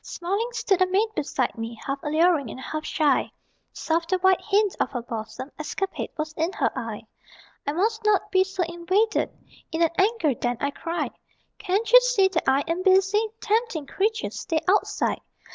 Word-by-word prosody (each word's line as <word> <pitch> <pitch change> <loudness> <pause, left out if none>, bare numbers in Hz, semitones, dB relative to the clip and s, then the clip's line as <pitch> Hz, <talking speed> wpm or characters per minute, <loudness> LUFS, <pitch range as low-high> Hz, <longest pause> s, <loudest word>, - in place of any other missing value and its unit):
Smiling 400 +7 -3
stood 385 -5 +1
a 370 - +5
maid 400 +4 +2
beside 275 -5 -1
me, 225 0 -5
Half 275 0 -2
alluring 310 -3 +2
and 255 - -8
half 310 +3 -5
shy; 295 -4 +1 0.4
Soft 330 +1 -1
the 375 - +2
white 375 0 +3
hint 415 -1 +2
of - - +1
her 245 - -2
bosom 225 +3 -6
Escapade 380 +5 -3
was 310 0 -3
in 325 +3 -1
her - - +1
eye. 230 -4 -5 0.6
"I 285 - 0
must 435 +6 0
not 425 -2 +2
be 375 0 +5
so 380 -1 -2
invaded," 360 +6 0 0.4
(In 325 +1 +1
an 330 - +3
anger 390 - +2
then 245 0 -2
I 280 - -1
cried) 335 +4 -3 0.5
"Can't 420 +3 -1
you - - +10
see - - +3
that 330 -7 0
I 270 +1 +3
am 335 +2 -1
busy? 390 +3 +3
Tempting 435 -8 0
creature, 440 +9 -1
stay 320 -2 -2
outside! 405 +3 +1
360 Hz, 180 wpm, -25 LUFS, 300-405 Hz, 0.6 s, you